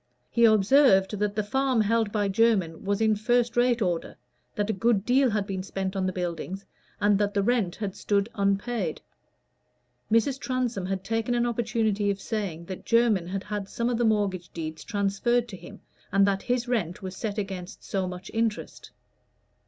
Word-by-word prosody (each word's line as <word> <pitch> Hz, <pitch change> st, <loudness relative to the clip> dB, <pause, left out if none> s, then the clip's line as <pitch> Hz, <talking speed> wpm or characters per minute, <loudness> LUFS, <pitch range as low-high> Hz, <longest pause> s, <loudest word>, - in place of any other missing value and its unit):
He 235 Hz, 0 st, +4 dB
observed 215 Hz, -2 st, +4 dB
that 210 Hz, 0 st, -1 dB
the 215 Hz, -, 0 dB
farm 265 Hz, +2 st, +1 dB
held 220 Hz, 0 st, +1 dB
by 205 Hz, -1 st, 0 dB
Jermyn 195 Hz, -5 st, +1 dB
was 200 Hz, +2 st, -1 dB
in 220 Hz, -1 st, +3 dB
first 240 Hz, +2 st, +1 dB
rate 240 Hz, -1 st, +3 dB
order, 175 Hz, -3 st, -2 dB, 0.4 s
that 205 Hz, +1 st, 0 dB
a -, -, -2 dB
good 205 Hz, 0 st, +1 dB
deal 260 Hz, +1 st, +4 dB
had 210 Hz, -2 st, 0 dB
been 190 Hz, -2 st, -3 dB
spent 190 Hz, 0 st, -4 dB
on 190 Hz, -1 st, 0 dB
the -, -, 0 dB
buildings, 180 Hz, +2 st, -4 dB, 0.3 s
and 205 Hz, -1 st, +3 dB
that 205 Hz, 0 st, 0 dB
the 200 Hz, -, +2 dB
rent 215 Hz, -6 st, +1 dB
had 200 Hz, -3 st, -4 dB
stood 205 Hz, 0 st, 0 dB
unpaid. 200 Hz, -2 st, -1 dB, 1.1 s
Mrs. 240 Hz, +4 st, +2 dB
Transome 250 Hz, -8 st, -2 dB
had 190 Hz, 0 st, -3 dB
taken 225 Hz, +3 st, -1 dB
an 240 Hz, 0 st, +2 dB
opportunity 220 Hz, -3 st, 0 dB
of 200 Hz, -1 st, -1 dB
saying 195 Hz, -6 st, -4 dB
that 185 Hz, +1 st, -7 dB
Jermyn 230 Hz, -7 st, +2 dB
had 195 Hz, +2 st, -3 dB
had 205 Hz, -2 st, -5 dB
some 235 Hz, +1 st, -1 dB
of 240 Hz, -, -1 dB
the -, -, +2 dB
mortgage 200 Hz, -5 st, 0 dB
deeds 160 Hz, -2 st, -6 dB
transferred 220 Hz, +3 st, 0 dB
to 195 Hz, -, -7 dB
him, -, -, -12 dB, 0.3 s
and 195 Hz, +1 st, +4 dB
that 195 Hz, -1 st, +1 dB
his 245 Hz, 0 st, -1 dB
rent 205 Hz, -6 st, -2 dB
was 185 Hz, 0 st, -5 dB
set 215 Hz, +1 st, -4 dB
against 190 Hz, -3 st, -5 dB
so 190 Hz, -2 st, -2 dB
much 180 Hz, +1 st, -8 dB
interest. 225 Hz, -1 st, -2 dB
205 Hz, 185 wpm, -26 LUFS, 195-230 Hz, 1.1 s, He